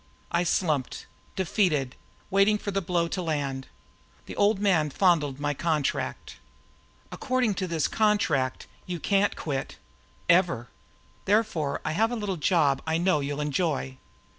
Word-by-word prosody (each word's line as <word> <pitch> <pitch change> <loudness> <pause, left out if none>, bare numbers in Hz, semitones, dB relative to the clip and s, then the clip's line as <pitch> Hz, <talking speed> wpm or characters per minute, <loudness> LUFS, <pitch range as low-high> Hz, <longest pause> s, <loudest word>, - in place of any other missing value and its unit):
I 170 +1 +2
slumped, 155 -7 0 0.3
defeated, 165 - 0 0.4
waiting 200 +2 +4
for 205 - -4
the 195 0 0
blow 170 -1 0
to 185 - -2
land. 140 -5 -2 0.6
The - - -8
Old 205 +1 +3
Man 180 -7 +2
fondled 150 -5 +2
my 145 0 0
contract. 155 -1 -2 0.7
"According 255 -4 0
to 185 - -1
this 165 -3 0
document, 190 -12 +1 0.2
you 175 -1 -4
can't 200 +4 +2
quit. 135 -4 -4 0.5
Ever. 170 -9 +3 0.6
Therefore 190 -9 +1
I - - 0
have 220 +8 +2
a - - -1
little 205 -5 -3
job 145 -3 +2
I 160 0 +1
know 175 -2 +2
you'll 145 +1 -3
enjoy. 145 -3 -1
170 Hz, 140 wpm, -27 LUFS, 145-195 Hz, 0.7 s, waiting